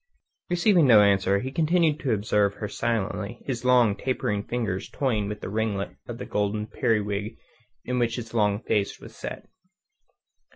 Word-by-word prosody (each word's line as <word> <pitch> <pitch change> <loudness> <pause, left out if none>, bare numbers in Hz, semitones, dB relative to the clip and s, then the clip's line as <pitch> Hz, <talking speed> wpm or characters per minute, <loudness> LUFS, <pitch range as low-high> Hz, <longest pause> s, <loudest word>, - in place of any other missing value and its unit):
Receiving 175 -3 +4
no 110 -4 +8
answer, 100 -1 +3
he 130 - -4
continued 160 0 +2
to 135 -6 -1
observe 105 -1 +1
her 105 - -4
silently, 105 0 -2
his 125 -3 -3
long, 125 -5 +4
tapering 105 -5 -1
fingers 105 -4 -3
toying 110 -7 -1
with 105 0 -6
a - - -3
ringlet 105 -1 -2
of - - -6
the - - -6
golden 105 +1 -1
periwig 105 -1 -1 0.5
in 125 0 -1
which 120 -1 +1
his 115 -2 -7
long 105 -2 +1
face 105 -2 -1
was - - -13
set. - - -7
110 Hz, 160 wpm, -26 LUFS, 100-125 Hz, 0.5 s, no